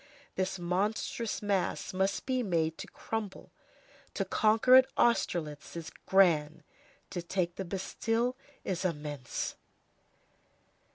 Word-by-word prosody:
This 190 0 -1
monstrous 205 +6 -1
mass 200 -2 -1
must 190 +1 0
be 255 -1 +1
made 165 -7 0
to - - -6
crumble. 215 -4 -5 0.6
To - - 0
conquer 220 +4 +3
at 260 0 +9
Austerlitz 170 -12 +1
is 165 -2 -6 0.2
grand; 165 -5 +4 0.5
to 175 - -3
take 175 0 -1
the 190 - -4
Bastille 225 +6 -1 0.3
is 185 -1 -2
immense. 150 -7 -3
190 Hz, 110 wpm, -31 LUFS, 170-220 Hz, 0.6 s, at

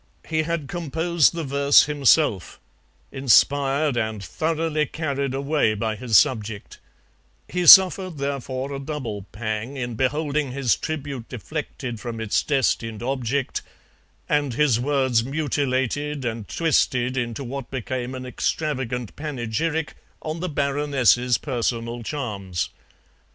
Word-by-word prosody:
He 160 -1 +1
had 160 -2 -3
composed 170 0 +1
the 165 - -3
verse 140 0 +5
himself, 145 - +2 0.5
inspired 140 +2 +3
and 110 -3 -2
thoroughly 155 - -1
carried 140 -4 -2
away 140 -5 +1
by 110 +1 -2
his 115 -1 +3
subject; 110 -4 0 0.7
he 180 -1 -2
suffered, 185 -2 +8
therefore, 140 -1 -3
a 135 - -4
double 130 -9 -5
pang 110 +4 -4
in 120 -2 -3
beholding 145 +2 -1
his 135 -4 +2
tribute 145 -6 -5
deflected 130 -2 -5
from 115 0 -6
its 110 -2 +1
destined 120 -5 0
object, 130 +1 -1 0.7
and 145 -5 0
his 135 -5 +3
words 130 -3 +1
mutilated 140 0 -1
and 115 -3 -4
twisted 130 -6 +1
into 120 +1 -3
what 135 0 -6
became 130 0 -4
an 130 0 -6
extravagant 125 -3 -2
panegyric 150 +2 -2 0.3
on 155 +1 -4
the 180 +1 -3
Baroness's 140 -4 +2
personal 120 -3 -2
charms. 105 - -4
135 Hz, 120 wpm, -23 LUFS, 120-150 Hz, 0.7 s, suffered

